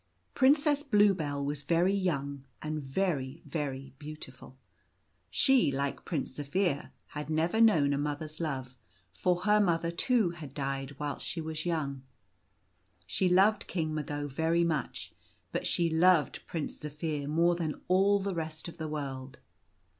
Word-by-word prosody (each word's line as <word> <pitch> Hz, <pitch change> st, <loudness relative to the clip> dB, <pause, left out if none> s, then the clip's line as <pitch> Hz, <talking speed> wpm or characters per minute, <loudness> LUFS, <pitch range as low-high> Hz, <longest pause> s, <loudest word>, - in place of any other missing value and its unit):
Princess 285 Hz, +2 st, +4 dB
Bluebell 195 Hz, -, +2 dB
was 145 Hz, 0 st, -2 dB
very 170 Hz, +6 st, +2 dB
young 140 Hz, -8 st, -1 dB, 0.2 s
and 155 Hz, 0 st, -3 dB
very, 140 Hz, -1 st, -2 dB
very 135 Hz, -4 st, -4 dB
beau 155 Hz, 0 st, -7 dB
tiful. 130 Hz, -3 st, -12 dB, 0.7 s
She, 265 Hz, -, +4 dB
like 140 Hz, +1 st, -2 dB
Prince 155 Hz, -6 st, -2 dB
Zaphir, 150 Hz, +1 st, 0 dB, 0.2 s
had 150 Hz, 0 st, -6 dB
never 165 Hz, +8 st, +2 dB
known 155 Hz, -11 st, +5 dB
a 140 Hz, -, 0 dB
mother's 150 Hz, +1 st, -3 dB
love, 130 Hz, -6 st, -3 dB, 0.4 s
for 180 Hz, -, +1 dB
her 210 Hz, +2 st, +4 dB
mother, 170 Hz, -4 st, +2 dB
too, 215 Hz, +1 st, +2 dB
had 150 Hz, -5 st, -10 dB
died 135 Hz, -1 st, -3 dB
whilst 145 Hz, 0 st, -4 dB
she 170 Hz, -, -3 dB
was 160 Hz, +1 st, -4 dB
young. 140 Hz, -5 st, -1 dB, 1.0 s
She 95 Hz, -, +1 dB
loved 195 Hz, +4 st, +4 dB
King 160 Hz, -3 st, -2 dB
Mago 145 Hz, -1 st, -3 dB
very 160 Hz, +5 st, +1 dB
much, 160 Hz, -4 st, -2 dB, 0.4 s
but -, -, -1 dB
she 170 Hz, -, +2 dB
loved 165 Hz, 0 st, +3 dB
Prince 160 Hz, -3 st, -4 dB
Zaphir 150 Hz, -1 st, -3 dB
more 170 Hz, +3 st, +3 dB
than 165 Hz, -3 st, -3 dB
all 195 Hz, +2 st, +4 dB
the 195 Hz, 0 st, -2 dB
rest 160 Hz, -1 st, -5 dB
of 170 Hz, -, -9 dB
the 160 Hz, -2 st, -4 dB
world. 135 Hz, -3 st, -5 dB
155 Hz, 145 wpm, -30 LUFS, 140-180 Hz, 1.0 s, known